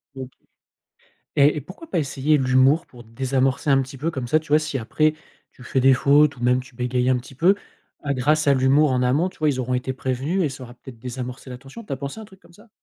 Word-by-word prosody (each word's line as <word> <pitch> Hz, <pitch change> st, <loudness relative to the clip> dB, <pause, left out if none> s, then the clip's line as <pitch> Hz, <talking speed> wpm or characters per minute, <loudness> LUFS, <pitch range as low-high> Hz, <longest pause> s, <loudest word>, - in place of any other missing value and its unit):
OK. 130 Hz, -1 st, -7 dB, 1.1 s
Et 145 Hz, +1 st, +4 dB
et -, -, -2 dB
pourquoi 185 Hz, -, -12 dB
pas 180 Hz, -, 0 dB
essayer 150 Hz, 0 st, +1 dB
l'humour 130 Hz, +5 st, +3 dB
pour 120 Hz, -2 st, -15 dB
désamorcer 130 Hz, +4 st, -1 dB
un 135 Hz, -1 st, +5 dB
petit 135 Hz, +1 st, -10 dB
peu? 160 Hz, +5 st, -1 dB
Comme 130 Hz, -6 st, -5 dB
ça, 155 Hz, +5 st, +3 dB
tu 155 Hz, -, -18 dB
vois, 150 Hz, +1 st, +5 dB
si 155 Hz, -3 st, -3 dB
après, 155 Hz, +7 st, +1 dB, 0.4 s
tu -, -, -17 dB
fais 130 Hz, +2 st, -1 dB
des 135 Hz, +1 st, +6 dB
fautes 145 Hz, +2 st, +4 dB
ou 120 Hz, -, -10 dB
même 125 Hz, +1 st, +3 dB
tu 130 Hz, -1 st, -17 dB
bégayes 125 Hz, +1 st, -1 dB
un 130 Hz, -, +3 dB
petit 125 Hz, +2 st, -12 dB
peu, 175 Hz, +9 st, +4 dB, 0.5 s
à 140 Hz, -1 st, -1 dB
grâce 150 Hz, +4 st, +1 dB
à 140 Hz, -, +5 dB
l'humour 135 Hz, +2 st, +3 dB
en 125 Hz, 0 st, +1 dB
amont, 140 Hz, +8 st, +2 dB
tu -, -, -17 dB
vois, 155 Hz, -, +1 dB
ils 130 Hz, -2 st, -2 dB
auront 125 Hz, 0 st, -2 dB
été 125 Hz, +1 st, -2 dB
prévenus 130 Hz, +8 st, -2 dB
et 155 Hz, -, +1 dB
ça 135 Hz, -1 st, -9 dB
aura 120 Hz, 0 st, -12 dB
peut-être 125 Hz, -1 st, -13 dB
désamorcé 125 Hz, +2 st, -7 dB
la 125 Hz, -, -7 dB
tension. 135 Hz, -, -12 dB
Tu 205 Hz, -, -8 dB
as -, -, -1 dB
pensé 140 Hz, -, -6 dB
à -, -, -8 dB
un -, -, -9 dB
truc 190 Hz, -2 st, -19 dB
comme -, -, -21 dB
ça? 210 Hz, +6 st, -19 dB
135 Hz, 260 wpm, -22 LUFS, 125-150 Hz, 1.1 s, des